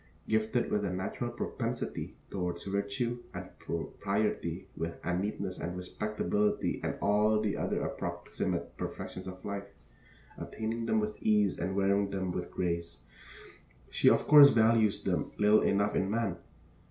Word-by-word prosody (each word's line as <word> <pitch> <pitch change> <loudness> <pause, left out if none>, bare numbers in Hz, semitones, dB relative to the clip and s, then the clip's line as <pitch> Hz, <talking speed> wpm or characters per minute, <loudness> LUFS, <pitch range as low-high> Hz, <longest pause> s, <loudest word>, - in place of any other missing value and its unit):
Gifted 110 +3 +1
with 105 - +1
a 100 - 0
natural 90 +1 -3
propensity - - -4 0.2
toward 90 -2 -2
virtue 100 +5 -1 0.2
and - - -6
propriety 95 0 -2 0.4
and 90 +2 0
neatness 100 -2 -3
and 90 +1 -4
respectability 105 +2 -1
and - - -1
all 105 +1 +4
the 105 -1 0
other - - -1
approximate - - -3
perfections 95 0 -5
of 95 0 -8
life, 100 0 -4 0.7
attaining 115 +1 -3
them 110 - +3
with 105 0 -3
ease 105 -3 +3
and 95 +3 -2
wearing 100 0 +2
them 95 -2 -2
with - - -4
grace, 85 -7 -3 0.9
she - - +5
of - - +3
course 145 -1 +10
values 110 -3 +3
them 90 -5 -1
little 105 +1 +5
enough 100 +1 +2
in 95 - +1
man. 105 -4 0
100 Hz, 140 wpm, -31 LUFS, 95-110 Hz, 0.9 s, course